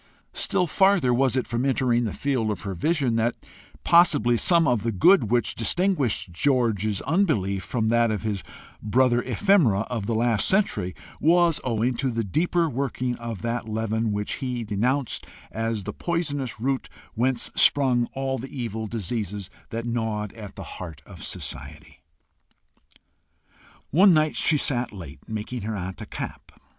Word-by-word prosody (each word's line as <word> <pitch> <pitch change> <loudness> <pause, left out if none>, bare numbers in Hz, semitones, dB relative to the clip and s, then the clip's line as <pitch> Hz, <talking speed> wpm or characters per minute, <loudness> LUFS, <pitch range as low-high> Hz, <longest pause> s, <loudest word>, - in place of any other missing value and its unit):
Still 185 -2 +1
farther 185 -6 +3
was 130 0 +2
it 130 - 0
from 120 +1 -2
entering 125 -3 +1
the 110 - -2
field 130 -6 -1
of 105 - -3
her 100 -3 -4
vision 130 - 0
that 115 +1 +1 0.5
possibly 170 -9 +5
some 170 +7 +3
of 120 -5 +2
the 115 - -1
good 125 - +4
which 120 0 +1
distinguished 130 - 0
George's 110 -2 +1
unbelief 120 - +1
from 110 0 -1
that 115 0 +3
of 110 -1 -2
his 105 -4 -2 0.4
brother 120 +3 +2
ephemera 170 - +3
of 110 -5 -3
the 115 - 0
last 115 -2 +2
century, 185 - +1 0.2
was 170 0 +3
owing 120 +1 0
to 135 - 0
the 115 -1 -1
deeper 165 - +1
working 130 -2 -2
of 115 -4 -6
that 115 -1 -3
leaven 110 0 -1
which 105 0 -2
he 125 -3 -3
denounced 120 +6 -1 0.2
as 115 -2 -2
the 105 +2 -5
poisonous 145 -8 -3
root 135 +3 -1 0.2
whence 125 +2 0
sprung 125 -4 +4
all 135 -1 -2
the 135 +3 -7
evil 110 -4 -4
diseases 105 -2 -4 0.2
that 115 +1 -4
gnawed 110 -3 -2
at 105 -4 -10
the - - -7
heart 80 -5 -9
of - - -11
society. - - -8 1.9
One 185 +4 +6
night 155 0 +2
she 155 - +3
sat 125 -4 0
late, 85 -8 -10
making 110 +3 -5
her 110 +2 -3
aunt 90 0 -6
a - - -7
cap. - - -7
120 Hz, 155 wpm, -25 LUFS, 110-135 Hz, 1.9 s, One